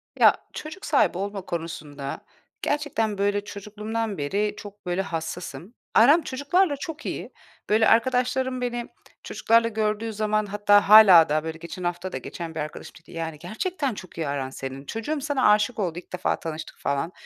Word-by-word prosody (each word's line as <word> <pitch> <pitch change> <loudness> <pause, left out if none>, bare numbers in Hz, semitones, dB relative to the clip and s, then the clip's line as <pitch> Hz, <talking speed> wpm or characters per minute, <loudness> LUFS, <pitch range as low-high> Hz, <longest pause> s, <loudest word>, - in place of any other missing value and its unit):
Ya, - - +7 0.2
çocuk 315 +6 -8
sahibi 280 - +2
olma 200 +1 -3
konusunda 155 -5 -6 0.4
gerçekten, 265 -8 -1
böyle, 205 +1 +1
çocukluğumdan 210 +1 -4
beri 200 +9 -1
çok, 205 -1 -11
böyle, 180 +1 0
hassasım. 175 +3 -5 0.2
Aram 290 +9 +6
çocuklarla 285 +5 +1
çok 320 +1 -7
iyi. - - -5 0.4
Böyle, 220 +1 +4
arkadaşlarım 255 +2 +2
beni 240 -1 -2 0.4
çocuklarla 230 0 +2
gördüğü 220 0 -1
zaman 215 0 0
hatta 205 0 +3
hâlâ 195 -7 +9
daha, 155 +1 +1
böyle, 160 0 -5
geçen 170 +2 -8
hafta 175 +1 -3
da - - -3
geçen 165 -2 -7
bir - - -3
arkadaşım 150 0 -6
dedi, - - -18
"Yani 165 -2 -5
gerçekten 275 - -3
çok 185 -4 -11
iyi 160 -3 -2
aran 140 -2 -2
senin, 135 +1 -7
çocuğum 280 - -3
sana 275 -5 +2
aşık 210 +3 +2
oldu. 175 -4 -1
İlk 180 - -18
defa 180 - -1
tanıştık." 160 -1 -6
falan. 140 +4 -1
205 Hz, 165 wpm, -25 LUFS, 170-230 Hz, 0.4 s, hâlâ